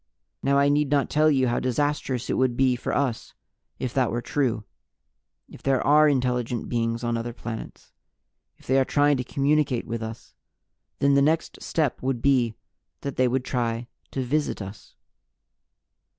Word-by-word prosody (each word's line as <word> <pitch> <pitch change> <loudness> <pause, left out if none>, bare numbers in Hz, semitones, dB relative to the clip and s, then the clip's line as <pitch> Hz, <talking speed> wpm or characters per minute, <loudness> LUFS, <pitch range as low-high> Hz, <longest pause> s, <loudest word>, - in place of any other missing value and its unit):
"Now, 140 0 +2
I 140 0 +4
need 145 0 +2
not 140 -1 +1
tell 155 +1 +4
you 135 -3 +3
how 120 - +1
disastrous 130 -1 -1
it - - -1
would 130 -2 +1
be 130 -2 +3
for 120 - -4
us 130 -5 -2 0.4
if 125 -2 -4
that 130 -3 +2
were 120 - -1
true. 125 -5 0 0.8
If - - -14
there 135 -1 +2
are 150 +1 +6
intelligent 125 -3 -1
beings 115 0 -1
on 120 0 0
other 120 +1 -4
planets, 115 -1 -8 0.7
if - - -21
they 135 +1 +3
are - - +4
trying 145 +1 +3
to 125 - -2
communicate 140 -2 +1
with 115 0 -4
us, 110 0 -8 0.6
then 140 0 +3
the 140 - +5
next 155 +3 0
step 155 -6 -1
would 130 -1 -1
be 120 -4 +2 0.5
that 140 - -4
they 130 - +3
would 125 +1 -1
try 120 -2 -1 0.2
to 135 - -3
visit 145 +4 -1
us." 100 +1 -9
130 Hz, 170 wpm, -25 LUFS, 120-140 Hz, 0.8 s, are